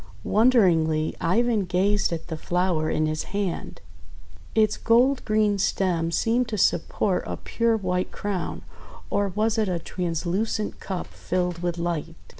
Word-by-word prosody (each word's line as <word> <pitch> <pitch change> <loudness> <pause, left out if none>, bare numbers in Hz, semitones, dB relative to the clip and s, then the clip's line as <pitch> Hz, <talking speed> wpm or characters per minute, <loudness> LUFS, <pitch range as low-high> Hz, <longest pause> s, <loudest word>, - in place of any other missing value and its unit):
Wonderingly 175 -10 +3
Ivan 215 +4 +2
gazed 195 +3 +1
at 165 -1 -4
the 160 - -5
flower 175 -1 0
in 155 - +1
his 155 0 -2
hand. 195 -4 -3 0.7
Its 215 -1 +3
gold 250 +4 +3
green 215 -2 +2
stem 175 -4 +1
seemed 230 +8 +1
to 220 -1 -3
support 180 +1 +1
a - - -4
pure 230 -1 0
white 180 -2 -1
crown, 200 -4 -4 0.2
— - - -18
or 200 0 +1
was 215 +3 0
it 215 -3 +1
a 180 - 0
translucent 180 +5 -2
cup 190 -2 -4
filled 180 -1 -2
with 175 -1 -2
light! 170 -1 -3
185 Hz, 145 wpm, -25 LUFS, 170-215 Hz, 0.7 s, Wonderingly